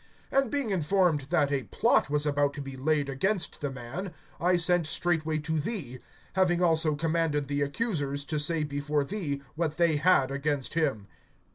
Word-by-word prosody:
(30)And 275 -2 +2
being 280 -5 -1
informed 180 -3 +2
that 150 -5 +2
a 140 -2 +1
plot - - +2
was 150 0 +1
about 145 -1 +1
to 145 - -5
be 135 -1 -7
laid 145 +2 0
against 180 +8 -1
the 145 - -1
man, 135 +9 -6 0.3
I 180 +1 +3
sent 175 -1 +2
straightway 160 -2 0
to 160 +1 -2
thee, 145 - -4 0.3
having 180 -2 +2
also 160 -3 +3
commanded 160 -2 0
the 145 0 -1
accusers 145 -4 -1
to 155 0 -2
say 155 +1 0
before 145 0 -1
thee 145 -5 -4
what 155 -1 -2
they 170 -3 +3
had 145 -4 +3
against 140 -1 -1
him. 140 -11 0
155 Hz, 170 wpm, -28 LUFS, 145-175 Hz, 0.3 s, I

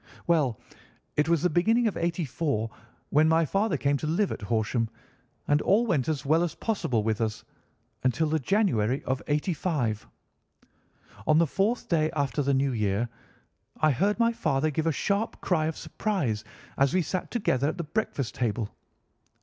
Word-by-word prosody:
"Well, 150 -9 +2 0.6
it 150 +2 +2
was 170 -3 +2
the 180 - +4
beginning 225 +8 +3
of 210 - -1
'84 155 -8 -1 0.4
when 155 +2 +5
my 165 0 +4
father 195 0 +1
came 140 +1 +1
to 155 - -4
live 180 +6 +1
at - - -5
Horsham, 110 +2 0 0.6
and 145 +1 +3
all 215 +5 +3
went 160 - +1
as 145 -4 -2
well 155 +4 +4
as 175 -2 -1
possible 130 - -1
with 110 +1 0
us 110 -1 -2 0.6
until 130 +5 +2
the 155 +1 +1
January 135 - +1
of 130 0 -1
'85. 145 - -1 1.2
On 155 - +5
the 170 - +5
fourth 200 - 0
day 155 -2 +2
after 145 0 0
the 140 0 +2
new 135 0 +2
year 105 0 0 0.7
I 155 - +4
heard 200 +10 +1
my 230 0 +3
father 155 -8 0
give 160 +3 -1
a - - +3
sharp 200 +8 -1
cry 160 -4 +1
of 160 - -3
surprise 140 - -2 0.4
as 135 +5 +3
we 185 - +3
sat 185 +4 -3
together 140 - +1
at 160 - -4
the 170 - -2
breakfast 150 - -2
table. 115 -3 -1
155 Hz, 170 wpm, -27 LUFS, 130-180 Hz, 1.2 s, when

